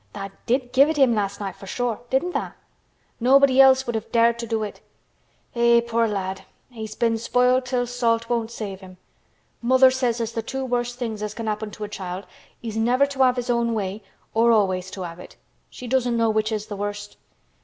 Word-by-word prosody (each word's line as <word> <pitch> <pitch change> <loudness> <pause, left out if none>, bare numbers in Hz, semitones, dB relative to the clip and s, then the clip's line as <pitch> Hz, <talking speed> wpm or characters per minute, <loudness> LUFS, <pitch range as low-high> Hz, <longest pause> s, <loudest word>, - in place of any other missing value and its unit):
Tha' 195 -1 -6 0.2
did 250 0 0
give 275 +3 +6
it 315 - -1
him 265 -4 +5
last 200 -2 -2
night 195 -2 -5
for 195 - -12
sure—didn't 245 - -1
tha? - - -4 0.6
Nobody 270 +2 +5
else 265 0 +6
would 235 - -3
have 220 0 -4
dared 235 0 +3
to 235 - -4
do 220 -1 -1
it. 210 - -7 0.7
Eh! 235 0 +4
poor 230 -1 0
lad! 190 -2 -3 0.3
He's 220 -3 -7
been 230 -1 +1
spoiled 250 +2 +2
till 245 -1 0
salt 230 -2 0
won't 230 -2 -1
save 210 -5 -6
him. 185 -1 -13 0.6
Mother 260 +2 +5
says 250 -3 0
as 230 -1 -2
th' 225 -1 -4
two 265 0 -3
worst 245 -1 -2
things 225 -4 -4
as 210 0 -4
can 230 - -5
happen 215 0 -3
to 210 - -8
a - - -3
child 190 -2 -6 0.4
is 225 -2 -5
never 245 +5 +3
to 280 -1 -4
have 255 -1 +5
his 245 -1 -2
own 235 -1 +1
way—or 215 +3 -1
always 190 -4 +1
to 190 -1 -6
have 170 0 -8
it. - - -12 0.3
She 250 - -10
doesn't 245 -1 +1
know 230 -1 +2
which 215 +1 0
is 215 -1 -2
th' - - -24
worst. 205 0 -5
230 Hz, 205 wpm, -23 LUFS, 210-250 Hz, 0.7 s, give